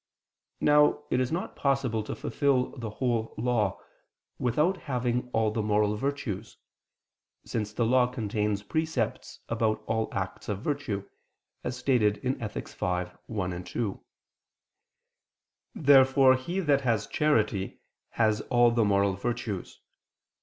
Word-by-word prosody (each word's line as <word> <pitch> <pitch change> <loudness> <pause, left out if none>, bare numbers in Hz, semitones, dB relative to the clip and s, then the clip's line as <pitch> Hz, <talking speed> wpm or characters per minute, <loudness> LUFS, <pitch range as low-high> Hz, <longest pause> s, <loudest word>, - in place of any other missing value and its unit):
Now 150 0 +4
it 125 - +2
is 130 -1 0
not 170 +3 -3
possible 135 -5 0
to - - -4
fulfil 135 -3 0
the 115 -5 -5
whole 115 0 -1
Law, 110 -4 0 0.6
without 150 +10 +2
having 125 -5 -2
all 110 -2 +2
the 110 - -1
moral 105 0 +2
virtues: 115 -5 -4 0.9
since 105 -2 -3
the 115 +2 0
law 125 +1 +4
contains 105 -4 -2
precepts 155 -3 -2
about 110 -1 0
all 110 0 -1
acts 95 +2 -4
of 100 0 -3
virtue, 110 -10 -2 0.6
as 125 0 -3
stated 125 -5 +2
in 130 +5 -2
Ethic. 105 -2 -5
v, 90 0 -1 0.2
1, 90 -5 -3
2. 100 +3 -4 1.7
Therefore 135 -2 +6
he 170 +9 -3
that 145 -5 +3
has 115 -5 +1
charity, 110 -10 0 0.3
has 110 -2 +2
all 120 -1 +5
the 115 -1 +2
moral 100 -1 +3
virtues. 110 -1 -4
115 Hz, 125 wpm, -28 LUFS, 105-130 Hz, 1.7 s, Therefore